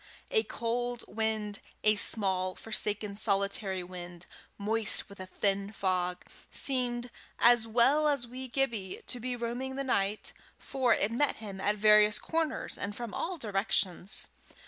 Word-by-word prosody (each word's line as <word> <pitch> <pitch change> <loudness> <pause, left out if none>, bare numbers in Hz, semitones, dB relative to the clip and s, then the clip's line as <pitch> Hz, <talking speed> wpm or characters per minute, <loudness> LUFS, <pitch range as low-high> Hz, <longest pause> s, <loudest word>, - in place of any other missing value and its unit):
A 450 -3 +4
cold 240 - -2
wind, 215 -1 -1 0.2
a 215 0 +5
small, 190 -3 +1
forsaken, 210 -2 -1
solitary 200 -1 +1
wind, 175 -1 -9 0.3
moist 215 +1 +2
with 200 -1 -14
a 185 - -7
thin 200 +1 -1
fog, 180 -3 -1 0.2
seemed, 245 -2 -1 0.3
as 235 -1 +5
well 260 +7 +4
as 280 -4 +1
wee 255 +2 -7
Gibbie, 235 -7 -1
to 245 - -1
be 250 +1 -3
roaming 245 +3 -4
the 275 - -2
night, 210 -5 -1 0.2
for 260 -3 0
it 205 - 0
met 280 +5 +1
him 200 -3 -8
at 205 +1 +1
various 210 0 +6
corners, 320 -2 -2
and 205 0 -4
from 235 -2 -6
all 360 +1 -3
directions. 200 - -1
215 Hz, 145 wpm, -30 LUFS, 200-245 Hz, 0.3 s, various